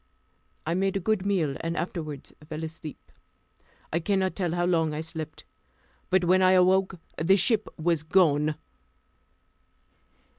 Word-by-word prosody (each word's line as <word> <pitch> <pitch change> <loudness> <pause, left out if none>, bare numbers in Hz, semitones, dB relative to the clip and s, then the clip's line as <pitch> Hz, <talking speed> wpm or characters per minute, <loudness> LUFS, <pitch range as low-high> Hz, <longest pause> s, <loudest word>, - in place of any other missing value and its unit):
I 165 - 0
made 195 +2 +1
a - - -1
good 200 0 0
meal, 165 -9 0
and 165 +1 -3
afterward 155 -5 -5 0.2
fell 155 +1 -5
asleep. 160 -1 -9 0.8
I 165 - +2
cannot 190 +1 0
tell 175 -4 -1
how 175 0 +1
long 165 -4 +1
I 155 - -2
slept, 160 -1 -7 0.7
but 185 -1 +3
when 185 +2 +4
I 185 0 +5
awoke 185 0 +3 0.2
the 190 +4 +5
ship 215 +2 +1
was 165 -1 +1
gone. 155 -3 +3
175 Hz, 140 wpm, -27 LUFS, 160-190 Hz, 0.8 s, I